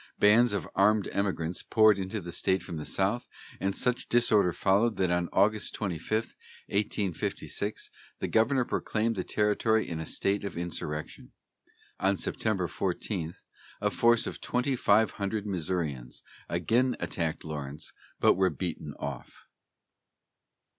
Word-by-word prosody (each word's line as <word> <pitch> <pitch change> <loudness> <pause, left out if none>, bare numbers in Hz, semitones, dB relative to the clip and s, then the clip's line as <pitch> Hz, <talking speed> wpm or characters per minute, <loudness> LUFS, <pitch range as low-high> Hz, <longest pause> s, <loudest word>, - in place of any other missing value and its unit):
Bands 115 +4 +6
of 100 - -2
armed 105 +1 +3
emigrants 90 -4 -1
poured 110 -3 +4
into 95 +3 -3
the 85 0 -7
state 95 +2 0
from 85 -4 -6
the 75 - -5
south, 100 +6 0 0.3
and 95 0 -1
such 125 -1 -1
disorder 110 -6 +4
followed 100 +6 +2
that 90 -2 +1
on 90 -1 0
August 105 +1 +2
25, 100 +3 -2 0.3
1856, 100 +1 -2 0.3
the - - -2
governor 120 +3 +3
proclaimed 115 0 -1
the 95 - -2
territory 110 +1 +1
in 80 -2 -4
a 80 - -4
state 100 +1 0
of 100 -4 -5
insurrection. 75 -3 -5 0.7
On 95 +1 +2
September 95 -4 -1
14 80 +2 -3 0.4
a 105 0 +1
force 120 +1 +4
of - - -6
twenty 125 +2 0
five 110 -2 +4
hundred 100 +1 -3
Missourians 80 -10 -3 0.3
again 120 +8 +2
attacked 80 -3 -2
Lawrence, 75 -2 -5 0.3
but - - +6
were 95 0 +3
beaten 75 -1 -4
off. 70 -3 -7
100 Hz, 135 wpm, -29 LUFS, 85-110 Hz, 0.7 s, Bands